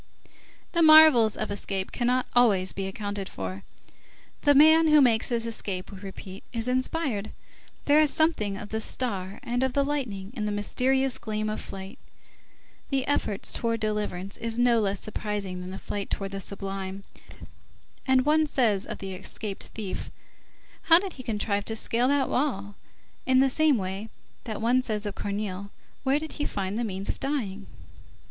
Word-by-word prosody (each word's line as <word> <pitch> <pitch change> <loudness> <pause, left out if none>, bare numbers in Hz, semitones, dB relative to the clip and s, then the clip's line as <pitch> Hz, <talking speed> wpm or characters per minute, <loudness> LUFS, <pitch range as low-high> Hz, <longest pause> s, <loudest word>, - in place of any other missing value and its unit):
The 340 - +2
marvels 310 -8 +7
of - - -3
escape 195 -1 -2
cannot 250 +1 +1
always 200 -7 +3
be 195 0 -3
accounted 200 0 -4
for. 95 0 -6 0.8
The 290 -1 +4
man 315 +3 +7
who 305 -1 +6
makes 235 -5 +3
his 235 -2 +1
escape, 200 -5 -1
we 195 - -9
repeat, 190 -1 -9
is 230 -1 -3
inspired; 255 -4 -1 0.6
there 290 +1 +5
is 305 -1 +5
something 220 -12 +1
of 205 +1 -8
the 220 +1 -2
star 200 -6 -3
and 245 +1 -1
of 265 -1 +1
the 280 - +2
lightning 240 -9 -3
in 215 -4 -2
the 210 - -1
mysterious 260 +5 +1
gleam 215 -1 -2
of 215 - -4
flight; 190 0 -8 0.9
the 270 -2 0
effort 210 -8 -1
towards 230 -1 0
deliverance 210 -3 -3
is 230 0 -3
no 240 -1 +4
less 200 -1 -1
surprising 205 -4 -4
than 180 - -7
the 190 - -6
flight 200 -1 -5
towards 195 -1 -3
the 195 - -4
sublime, 195 0 -5 1.0
and 260 0 +4
one 310 +1 +3
says 220 -9 +2
of - - -5
the 195 -1 -6
escaped 200 +2 -5
thief: 210 -4 -5 0.8
"How 330 - +8
did 380 +1 -2
he 260 - -9
contrive 210 -3 -1
to 225 - +1
scale 235 +2 +1
that 280 0 +2
wall?" 205 -8 -1 0.5
in 260 0 +5
the 270 0 +4
same 310 -2 +3
way 195 +2 -4 0.4
that 220 -2 -5
one 245 +2 +3
says 215 -4 -3
of 205 - -3
Corneille: 200 -1 -4 0.3
"Where 270 +1 +2
did 310 +1 -5
he 295 - -3
find 195 0 -3
_the - - 0
means 195 -3 -4
of - - -3
dying? 215 -9 -3
220 Hz, 170 wpm, -27 LUFS, 195-260 Hz, 1.0 s, How